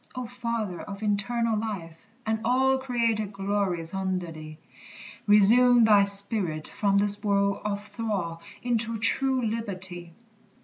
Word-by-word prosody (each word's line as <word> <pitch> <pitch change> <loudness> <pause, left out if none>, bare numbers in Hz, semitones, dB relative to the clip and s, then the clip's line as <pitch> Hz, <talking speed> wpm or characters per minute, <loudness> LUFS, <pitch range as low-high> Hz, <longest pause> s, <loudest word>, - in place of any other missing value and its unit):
O 255 -1 -4
Father 230 -6 -4
of 200 +1 -8
eternal 225 +3 0
life, 195 -7 -6 0.2
and 220 0 -1
all 265 +3 +2
Created 230 -5 -1
glories 195 -4 -2
under 185 -3 -3
thee! 155 -1 -10 0.7
Resume 235 +4 +5
thy 210 -2 +5
spirit 200 -6 +2
from 200 -1 0
this 205 +1 0
world 200 -1 0
of 205 0 -4
thrall 195 -8 -4 0.2
Into 230 -2 +2
true 260 +3 +3
liberty. 185 -6 -4
205 Hz, 125 wpm, -26 LUFS, 195-230 Hz, 0.7 s, Resume